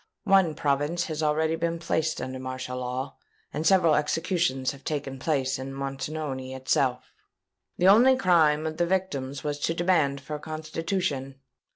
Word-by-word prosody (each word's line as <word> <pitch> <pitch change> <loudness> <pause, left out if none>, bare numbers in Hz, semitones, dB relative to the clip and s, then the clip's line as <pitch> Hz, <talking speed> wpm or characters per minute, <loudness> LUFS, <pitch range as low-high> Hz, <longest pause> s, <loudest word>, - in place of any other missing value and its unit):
One 190 -6 +4
province 145 +5 0
has 155 -3 -4
already 160 +1 +1
been 170 0 -1
placed 160 -1 -1
under 130 +1 -5
martial 130 0 -5
law; 125 +1 -4 0.4
and 155 +2 -1
several 175 -4 +5
executions 150 -3 0
have 140 0 -13
taken 140 -3 -4
place 135 -3 0
in 135 +1 -6
Montoni 135 -1 -4
itself. 130 -1 0 0.6
The 180 - +3
only 240 +7 +7
crime 160 -7 +3
of 155 0 -3
the 175 - +1
victims 145 -8 -2
was 145 0 -2
a 165 - 0
demand 165 -6 +2
for 145 +2 -6
a - - -6
Constitution. 155 -2 -3
150 Hz, 155 wpm, -27 LUFS, 135-165 Hz, 0.6 s, only